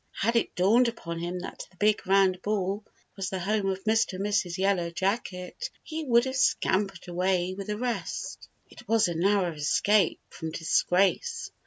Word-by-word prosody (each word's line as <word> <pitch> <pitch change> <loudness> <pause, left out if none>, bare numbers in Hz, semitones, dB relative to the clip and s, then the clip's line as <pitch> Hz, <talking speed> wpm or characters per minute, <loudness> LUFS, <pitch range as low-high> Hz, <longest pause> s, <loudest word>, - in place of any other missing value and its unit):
Had 230 +4 0
it 230 - +1
dawned 220 +7 +4
upon 170 -8 -5
him 175 +1 -4
that 185 - -7
the 185 - -26
big 210 -1 +2
round 190 -1 +3
ball 205 0 -1 0.3
was 195 -1 -3
the 190 - -3
home 195 +2 0
of 190 0 -3
Mr. 220 -1 +2
and 190 +2 -3
Mrs. 200 -4 0
Yellow 190 -3 +1
Jacket, 190 - -3
he 315 0 -5
would 235 -1 +4
have 260 0 -3
scampered 195 -7 +1
away 180 +1 0
with 195 0 -7
the 210 0 -2
rest. 245 0 -4 0.2
It - - -15
was 225 -3 +3
a 175 - -2
narrow 185 +1 +2
escape 165 +5 +2
from 160 - -6
disgrace. 185 - +1
195 Hz, 175 wpm, -27 LUFS, 180-215 Hz, 0.3 s, dawned